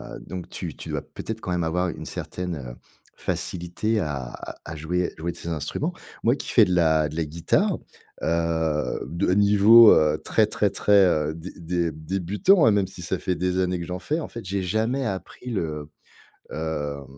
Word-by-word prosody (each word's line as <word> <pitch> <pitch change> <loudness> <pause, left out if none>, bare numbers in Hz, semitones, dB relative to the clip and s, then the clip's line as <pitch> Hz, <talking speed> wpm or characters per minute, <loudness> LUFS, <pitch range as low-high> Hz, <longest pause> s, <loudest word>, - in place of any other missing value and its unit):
Heu, - - -8
donc, 90 -1 -7
tu - - -6
tu - - -9
dois - - -2
peut-être 110 0 -7
quand 90 - -4
même 90 -1 0
avoir 90 +3 0
une - - -7
certaine, 90 -2 -4
heu, 60 -4 -7 0.4
facilité 90 +6 -2
à 70 -7 -3 0.3
à 80 - -6
jouer 85 +4 -1
jouer 85 +2 -3
de 85 - -12
ces 85 - -6
instruments? 80 -3 -2 0.3
Moi, - - +4
qui - - -7
fais - - +6
de 90 - -1
la 80 -3 +3
de 75 - -9
la 85 - 0
guitare, 85 - +1 0.5
heu, 80 -2 0
de 90 +2 -1
niveau, 105 +3 +8
heu, 75 0 +3
très, - - +3
très, - - 0
très, 100 -2 +5
heu, 75 -3 +1
dé 85 +3 -8
dé 85 -1 -1
débutant, 95 - +2
hein, 110 - +6
même 100 -2 +2
si 95 -2 -10
ça 85 - -2
fait 90 - -1
des 90 +1 0
années 90 -1 0
que 85 - -4
j'en 90 +1 -5
fais, 155 +9 -1
en 160 - -5
fait, 115 - -8
j'ai 95 +1 -2
jamais 110 +8 0
appris 115 +5 -5
le, 75 -7 -3 0.6
hem, 75 -3 -3
90 Hz, 195 wpm, -24 LUFS, 80-100 Hz, 0.6 s, niveau